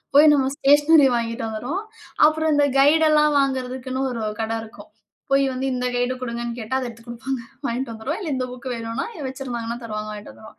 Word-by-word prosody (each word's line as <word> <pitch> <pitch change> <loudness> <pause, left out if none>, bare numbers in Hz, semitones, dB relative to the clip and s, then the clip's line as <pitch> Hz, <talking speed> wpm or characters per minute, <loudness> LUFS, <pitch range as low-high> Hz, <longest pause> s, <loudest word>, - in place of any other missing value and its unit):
போய் 300 +1 +8
நம்ம 270 -1 +1
ஸ்டேஷனரி 290 +1 +6
வாங்கிக்கிட்டு 230 -1 -2
வந்துருவோம். 250 - -3 0.5
அப்புறம் 315 0 0
இந்த 290 - +4
கைடுலாம் 300 +1 +5
வாங்குறதுக்குன்னு 260 0 -2
ஒரு 230 - -4 0.2
கட 220 - -2
இருக்கும். 220 - -14 0.4
போய் 275 0 +4
வந்து 260 +1 -3
இந்த 250 0 -1
கைடு 245 +1 0
குடுங்கன்னு 235 -1 -4
கேட்டா, 225 +2 -4
அத 255 - -3
எடுத்துக் 230 0 -13
குடுப்பாங்க 255 +2 -4 0.2
வாங்கிட்டு 245 -1 -2
வந்துருவோம். 265 - -4
இல்ல 350 - -4
இந்த 255 - -1
புக் 250 0 -10
வேணுனா, 230 +2 -3 0.2
வச்சிருந்தாங்கன்னா 240 -3 -4
தருவாங்க. 215 -1 -5
வாங்கிட்டு 210 0 -8
வந்துருவோம். 220 - -15
255 Hz, 175 wpm, -23 LUFS, 235-280 Hz, 0.5 s, போய்